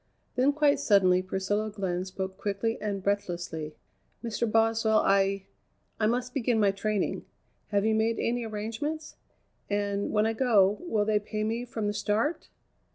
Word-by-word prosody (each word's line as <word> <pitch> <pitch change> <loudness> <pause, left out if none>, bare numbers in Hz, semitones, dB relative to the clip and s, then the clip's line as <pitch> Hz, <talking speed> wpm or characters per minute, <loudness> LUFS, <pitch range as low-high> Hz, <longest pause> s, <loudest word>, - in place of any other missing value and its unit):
Then 260 +3 +4
quite 290 -1 +3
suddenly 195 -8 +4
Priscilla 195 +3 -1
Glenn 185 -3 -2
spoke 190 0 -5
quickly 210 +3 -2
and 200 -2 -3
breathlessly: 175 -6 -2 0.5
"Mr. 230 -1 -1
Boswell, 225 -1 +3
I 195 0 +2 0.5
I 215 - +3
must 245 +2 -1
begin 240 -4 +1
my 205 -2 +4
training. 205 0 -1 0.4
Have 205 0 +1
you 220 - +3
made 220 +1 +1
any 240 +1 -1
arrangements? 230 +9 -4 0.5
And, 205 0 -1
when 210 0 +2
I 225 - +1
go, 215 -5 +3
will 215 -8 +1
they 215 -1 +2
pay 215 +1 -4
me 230 +3 -2
from 225 -3 -4
the 205 - 0
start?" 225 +11 -1
215 Hz, 155 wpm, -28 LUFS, 200-225 Hz, 0.5 s, Then